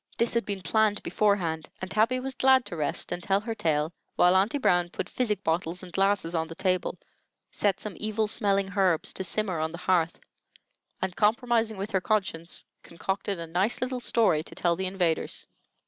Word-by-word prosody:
This 235 - +1
had 235 0 0
been 200 -2 -3
planned 215 -1 +2
beforehand, 175 -7 0
and 185 0 -6
Tabby 230 +5 +2
was 265 +1 -3
glad 260 -1 +4
to - - -5
rest 150 -3 0
and 175 0 -3
tell 195 +2 +2
her 225 +1 -3
tale 155 -5 0 0.2
while 180 +1 +5
Aunty 200 +9 +3
Brown 175 -9 +2
put - - -4
physic 210 -6 -1
bottles 170 +2 -1
and 180 - -11
glasses 195 -3 +2
on 160 -1 0
the 165 - -9
table, 185 0 0 0.5
set 205 -2 0
some 210 - -5
evil 215 0 -1
smelling 200 -3 +1
herbs 185 -5 +2
to 190 - -2
simmer 190 -2 -1
on 160 0 0
the 170 - -8
hearth, 175 -2 +1 0.9
and, 185 -1 -2
compromising 225 0 +2
with 200 +2 -4
her 190 - +1
conscience, 185 -5 -2 0.2
concocted 190 +3 -3
a 170 - -5
nice 180 +7 +1
little 255 0 -2
story 225 -10 +2
to - - -11
tell 170 -1 +1
the 190 +2 -2
invaders. 180 -4 -1
195 Hz, 190 wpm, -27 LUFS, 175-215 Hz, 0.9 s, while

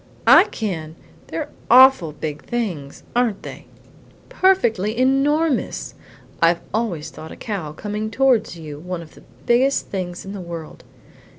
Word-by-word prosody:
"I - - +8
can! 165 -8 -5 0.3
They're 165 - -4 0.2
awful 255 -9 +7
big 150 0 -5
things, 180 -13 -4
aren't 240 -5 +1
they?" - - -9 0.6
"Perfectly 225 - +2
enormous! 275 +3 +1 0.5
I've 170 +1 +4
always 210 -9 -2
thought 160 - -10
a - - -8
cow 195 -9 -5
coming 210 +5 -4
towards 245 -5 +2
you 150 -3 -8
one 175 +1 -5
of 155 - -16
the - - -16 0.2
biggest 260 +3 +2
things 180 -2 -5
in 195 - -7
the 200 - -6
world." 170 -2 -8
200 Hz, 135 wpm, -21 LUFS, 165-245 Hz, 0.6 s, I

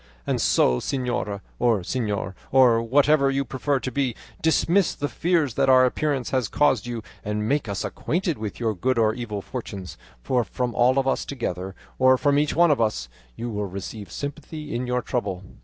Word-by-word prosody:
And - - 0
so, 60 - +3
señora, 120 -7 -2 0.2
or 115 -5 +3
señor, 105 -2 -2 0.2
or 125 -4 +5
whatever 140 +4 +3
you 135 0 0
prefer 135 +2 -1
to 130 - -3
be, 135 -4 -1 0.3
dismiss 170 +3 +2
the 145 - -2
fears 165 -5 +1
that - - +2
our 130 -1 +7
appearance 135 0 -1
has 130 -4 +1
caused 130 -7 +2
you 120 -2 -4 0.2
and 105 +1 -2
make 140 -4 0
us 100 - -2
acquainted 175 - -2
with 105 -2 -5
your 115 -2 0
good 125 +6 0
or 110 -1 +3
evil 110 -4 -5
fortunes, 100 -7 -7 0.2
for 125 - +1
from 125 +1 -3
all 125 +3 +3
of 135 -1 +2
us 135 - +1
together, 95 -8 -4 0.2
or 130 0 +6
from 145 +2 +2
each 150 0 0
one 170 -1 +5
of 140 - +2
us, 105 - -1 0.3
you 120 0 -4
will 105 -1 -2
receive 100 +2 -7
sympathy 150 +2 -6
in 120 +1 -2
your 125 -1 0
trouble." 100 -8 -3
125 Hz, 190 wpm, -24 LUFS, 110-140 Hz, 0.3 s, our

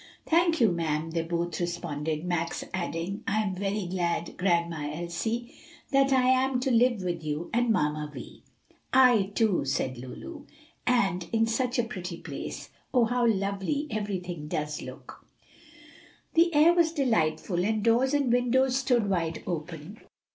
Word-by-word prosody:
"Thank 335 0 +3
you, 225 -5 +5
ma'am," 165 -1 -1
they 165 0 0
both 170 0 -2
responded, 160 -2 -3
Max 170 -2 -2
adding, 185 +3 -3
"I 210 +2 +1
am 195 -3 -2
very 195 +1 -2
glad, 175 -1 -2
Grandma 170 -5 0
Elsie, 220 - -3 0.4
that 275 0 +4
I 260 -1 +4
am 260 0 +3
to 265 0 0
live 240 -3 +3
with 175 -2 -3
you 155 +2 -4
and 240 +1 +2
Mamma 150 -6 0
Vi." - - -10 0.5
"I, 245 -7 +5
too," 215 -6 +2
said 130 -2 -2
Lulu; 285 - -9 0.4
"and 195 -8 +1
in 225 0 +3
such 245 +3 -1
a 240 - +3
pretty 185 -7 -6
place. - - -7 0.2
Oh, 245 -3 +4
how 245 +1 +1
lovely 200 +7 0
everything 180 -7 -4
does 150 0 -3
look!" - - -10 1.1
The 340 +1 +4
air 315 +2 +6
was 335 -2 +3
delightful, 180 - +1
and 215 +1 0
doors 245 +5 +3
and 275 -4 +2
windows 255 +1 +2
stood 250 -5 +2
wide 165 -4 -1
open. 165 +3 -6
195 Hz, 150 wpm, -28 LUFS, 170-245 Hz, 1.1 s, air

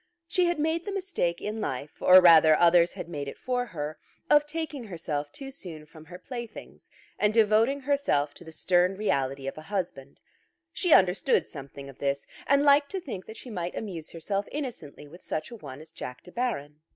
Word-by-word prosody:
She 360 +2 +1
had 345 -1 0
made 320 +2 0
the 405 - -3
mistake 370 - -2
in 215 +1 -4
life, 140 -5 -5
or 185 0 +8
rather 160 -3 +8
others 170 0 +5
had - - -7
made 145 -4 -5
it 140 - -7
for 250 -1 -2
her, 155 -4 -5 0.3
of 295 0 +6
taking 300 -5 -5
herself 155 -6 -4
too 270 -1 -8
soon 165 - -9
from 155 0 -15
her 175 +2 -10
playthings 235 +2 -9 0.3
and 210 - +3
devoting 225 +5 +3
herself 265 - +1
to - - -14
the 160 - -11
stern 180 +3 +2
reality 135 -9 -1
of 135 +3 -5
a 155 - -13
husband. 170 -9 -4 0.5
She 360 - 0
understood 190 +7 +4
something 140 -1 -10
of 135 - -13
this, 140 0 -1 0.2
and 280 +1 +4
liked 285 0 +5
to 385 - -1
think 235 - -7
that 220 - -9
she 250 - -9
might 180 -3 -4
amuse 175 -8 -5
herself 195 +4 -3
innocently 235 - -6
with 175 +5 -14
such 155 +6 -4
a - - -7
one 145 - -10
as 155 0 -14
Jack 125 -5 -8
De 180 - -13
Baron. 155 - -3
180 Hz, 200 wpm, -27 LUFS, 155-255 Hz, 0.5 s, or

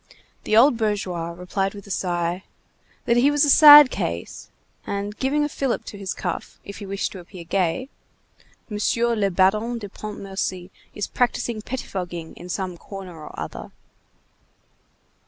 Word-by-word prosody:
The 215 - +2
old 245 +1 +6
bourgeois 195 -6 -2
replied 180 +3 -3
with 200 - -10
a 200 - -9
sigh, 175 0 -1 0.6
that 235 - +3
he 260 +4 +5
was 290 0 +3
a 285 - +4
sad 295 -2 +10
case, 85 +1 -4 0.4
and 200 +1 -3
giving 280 +4 0
a - - +1
fillip 275 -4 -2
to 205 - -8
his 195 -2 -4
cuff, 175 -3 -5
if 200 - -9
he 200 - -8
wished 195 0 -2
to 190 - -9
appear 175 0 -11
gay: 185 +8 -1 0.8
"Monsieur 230 +2 0
le 200 -2 +1
Baron 210 +6 +2
de 205 -3 -7
Pontmercy 195 -3 -5 0.2
is 205 - -2
practising 240 -2 -1
pettifogging 180 -9 -5
in 175 - -11
some 180 -1 -3
corner 195 -3 -9
or - - -9
other." - - -7
200 Hz, 155 wpm, -23 LUFS, 180-235 Hz, 0.8 s, sad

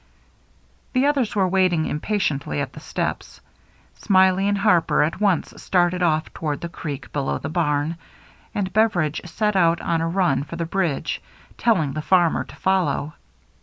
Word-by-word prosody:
The 255 +2 +3
others 275 -7 +1
were 195 -2 +3
waiting 180 -4 +2
impatiently 150 - -1
at 70 - -3
the - - -9
steps. - - -4 0.6
Smiley 190 0 +3
and 205 0 +1
Harper 190 -7 +3
at 165 +6 -2
once 195 -5 +1
started 180 0 +1
off 155 -3 +1
toward 150 -3 -3
the 170 - -4
creek 145 -5 -7
below 140 -2 -1
the 140 - -5
barn; 155 -1 0 0.6
and 190 -2 -2
Bever 215 -4 +3
idge 155 +3 -7
set 210 +3 0
out 170 -2 +3
on 165 -1 -1
a 165 - 0
run 170 -7 +1
for 155 +3 -8
the 170 0 -2
bridge, 170 -4 -1 0.3
telling 165 -12 +1
the 155 - -3
farmer 175 0 +3
to - - -13
follow. 185 -5 0
175 Hz, 165 wpm, -22 LUFS, 155-195 Hz, 0.6 s, The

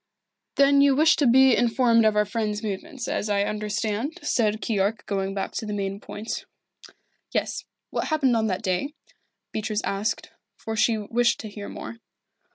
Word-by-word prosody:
"Then 280 0 +5
you 280 -1 +5
wish 315 +3 +5
to 285 - +3
be 260 +1 +6
informed 235 -1 +3
of 215 - +2
our 210 0 +3
friend's 210 0 -2
movements, 220 +5 -5
as 210 - -2
I 200 -1 +2
understand 215 +6 -2
it?" - - -14
said 215 -6 +1
Keyork 210 -1 -1
going 195 -1 -2
back 195 - -2
to - - -4
the 210 - -3
main 195 0 -3
point. 210 +2 -6 0.8
"Yes - - -2 0.3
what - - -1
happened 280 -6 +2
on 220 -1 +1
that 190 +1 -2
day?" 215 +11 -1 0.6
Beatrice 215 0 -2
asked, 200 +3 -2 0.3
for 220 - -5
she 220 +1 +3
wished 235 +3 +1
to 220 - -7
hear 205 0 -8
more. 230 - -8
220 Hz, 170 wpm, -25 LUFS, 205-245 Hz, 0.8 s, be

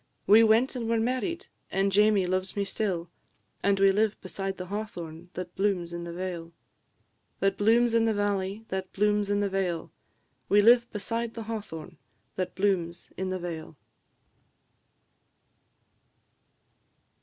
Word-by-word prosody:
We 215 +3 +7
went 225 +4 +4
and 230 -2 -3
were 230 -1 +2
married, 260 +10 -1 0.2
and 195 +1 +1
Jamie 205 -1 +4
loves 185 +1 -2
me 200 -1 0
still, 185 -4 -2 0.5
And 200 -1 +2
we 195 0 +6
live 215 +1 +1
beside 195 0 -4
the 180 - -5
hawthorn 175 -5 -6
that 180 0 -6
blooms 185 -4 0
in 170 0 -5
the 170 - -6
vale 170 -1 -5 0.9
That 195 0 +2
blooms 230 +3 +3
in 230 -1 +4
the 225 - +2
valley, 205 +1 -1
that 190 0 -4
blooms 210 0 +1
in 205 0 +1
the 205 - +1
vale, 185 -4 -2 0.6
We 205 - +5
live 235 +1 +6
beside 230 +2 -1
the 225 - -5
hawthorn 210 -8 -7 0.4
that 185 -1 -3
blooms 180 -4 -1
in 190 0 -3
the 185 - -1
vale. 165 -3 -6
195 Hz, 145 wpm, -28 LUFS, 180-220 Hz, 0.9 s, We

